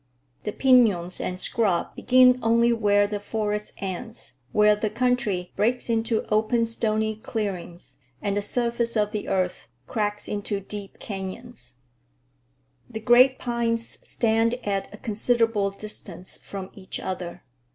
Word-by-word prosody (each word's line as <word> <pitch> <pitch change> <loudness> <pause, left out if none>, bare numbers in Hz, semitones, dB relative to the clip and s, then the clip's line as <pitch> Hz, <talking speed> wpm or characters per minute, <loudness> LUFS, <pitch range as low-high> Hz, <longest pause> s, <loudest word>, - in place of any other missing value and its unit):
The 210 - -1
piñons 210 -9 +3
and 180 0 -3
scrub 195 -7 +1
begin 255 0 +5
only 235 +1 +4
where 205 -2 +3
the 205 0 -3
forest 210 0 -2
ends, 195 - -6 0.2
where 210 0 +5
the 210 +1 -1
country 225 -6 0
breaks 240 +2 +1
into 225 0 0
open, 220 +2 +2
stony 220 -1 0
clearings 195 -6 -4 0.2
and 200 -1 -1
the 205 - +1
surface 235 +1 -1
of 210 -1 +1
the 210 -2 -4
earth 185 -1 -1 0.2
cracks 210 - -2
into 205 -1 -2
deep 200 0 -8
canyons. 195 - -7 1.1
The 220 - -5
great 245 +4 +6
pines 235 -1 -1
stand 230 +1 +2
at 195 -1 -1
a 210 - -10
considerable 225 -1 +1
distance 195 -3 -7
from 195 -1 -8
each 190 -2 -7
other. 180 -1 -5
215 Hz, 130 wpm, -25 LUFS, 200-230 Hz, 1.1 s, great